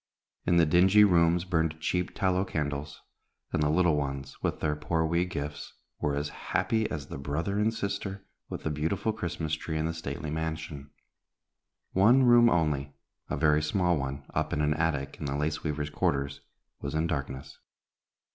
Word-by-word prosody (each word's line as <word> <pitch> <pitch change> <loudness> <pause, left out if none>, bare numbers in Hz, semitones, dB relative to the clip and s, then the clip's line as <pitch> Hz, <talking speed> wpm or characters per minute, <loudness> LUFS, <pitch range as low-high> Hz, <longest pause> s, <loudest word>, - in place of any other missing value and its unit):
In 85 -1 +4
the 85 - +6
dingy 95 +6 +6
rooms 85 -2 +4
burned 80 -3 0
cheap 90 +2 -1
tallow 95 -1 +2
candles, 75 -4 -4 0.5
and - - +1
the 75 - +2
little 85 0 +3
ones, 70 -1 -3
with - - -1
their 75 -1 0
poor 80 +2 0
wee 85 +2 +1
gifts, 75 -4 -5 0.3
were 75 -1 0
as 75 +1 -2
happy 110 +7 -1
as 75 -2 -4
the 65 - -7
brother 80 +8 -2
and 110 +1 +3
sister 100 -2 -4 0.2
with - - -6
the 80 - -1
beautiful 85 +9 -1
Christmas 85 -6 -3
tree 80 0 -2
in 80 - 0
the 80 - -1
stately 75 -2 -5
mansion. 80 -3 -4 1.0
One 115 +8 +5
room 120 -1 +7
only, 75 -6 0 0.3
a - - -1
very 75 -1 +4
small 90 +3 +2
one, 70 -1 -4
up - - -1
in 75 - 0
an 75 0 +3
attic 75 -4 -1
in - - -4
the 70 0 -1
lace 75 +1 -1
weavers' 75 -1 -2
quarters, 70 -1 -1 0.4
was - - -4
in 80 +1 +1
darkness. 70 -3 -4
80 Hz, 175 wpm, -29 LUFS, 75-90 Hz, 1.0 s, room